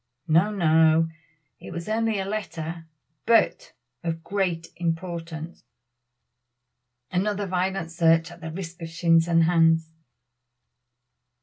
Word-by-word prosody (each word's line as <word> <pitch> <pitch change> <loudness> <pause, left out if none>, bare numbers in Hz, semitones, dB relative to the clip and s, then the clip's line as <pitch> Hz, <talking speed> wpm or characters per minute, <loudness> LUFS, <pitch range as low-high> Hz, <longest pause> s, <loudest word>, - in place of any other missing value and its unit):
"No! 165 +6 +4
no! 160 -4 +4 0.5
it - - -10
was 170 0 -6
only 220 0 0
a 190 - -2
letter, 170 -5 -5 0.4
but 230 -2 +2 0.3
of 165 -1 -3
great 180 -4 -2
importance." 165 -1 -4 1.5
Another 205 +2 0
violent 185 -2 -2
search 165 0 +3
at 175 0 -13
the 160 - -5
risk 170 0 -7
of 165 - -5
shins 165 0 +3
and 165 -1 +4
hands. 165 -1 +3
170 Hz, 110 wpm, -25 LUFS, 165-190 Hz, 1.5 s, No